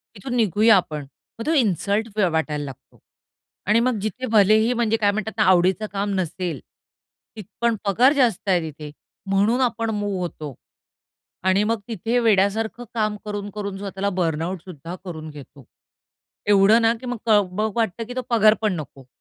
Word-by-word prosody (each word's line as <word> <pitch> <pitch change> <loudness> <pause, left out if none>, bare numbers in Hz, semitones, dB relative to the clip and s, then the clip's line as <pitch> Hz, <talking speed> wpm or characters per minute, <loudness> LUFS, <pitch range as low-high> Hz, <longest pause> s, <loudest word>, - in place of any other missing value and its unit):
तिथून 245 +5 -5
निघूया 220 0 +4
आपण. 150 -5 -3 0.3
मग 230 - -5
तो 320 - +1
इन्सल्ट 210 - +1
व 195 -4 +3
वाटायला 155 -2 -1
लागतो. 135 -3 -12 0.7
आणि 215 +3 +4
मग 245 -1 +1
जिथे 215 +5 -3
भलेही 220 +2 +4
म्हणजे 230 -2 +1
काय 205 -2 +2
म्हणतात 215 +1 -3
ना 210 - +3
आवडीचं 185 +3 +3
काम 200 0 -1
नसेल, 175 -3 -3 0.8
तिथ 215 -3 -8 0.2
पण 235 -1 +2
पगार 240 +8 +4
जास्त 235 -8 +1
आहे 180 -2 +3
तिथे 150 0 -10 0.4
म्हणून 205 +6 +2
आपण 230 -2 0
मूव्ह 205 -2 -2
होतो 155 -5 -6 0.9
आणि 190 +2 +3
मग 225 +1 0
तिथे 230 +2 -1
वेड्यासारखं 220 +1 +1
काम 215 -2 0
करून-करून 205 -1 -5
स्वतःला 195 0 -3
बर्नआउट 165 +1 -1
सुद्धा 170 -1 -8
करून 160 -3 -7
घेतो. 140 -3 -13 0.8
एवढं 205 +3 +5
ना 225 0 +4
की - - -8
मग 245 -1 -3
क 215 -2 +6
ब 215 +4 -1
वाटतं 230 -1 -1
की 245 - -6
तो 255 - -1
पगार 220 -3 +5
पण 215 -3 +1
नको. 140 -5 -8
205 Hz, 165 wpm, -22 LUFS, 180-225 Hz, 0.9 s, क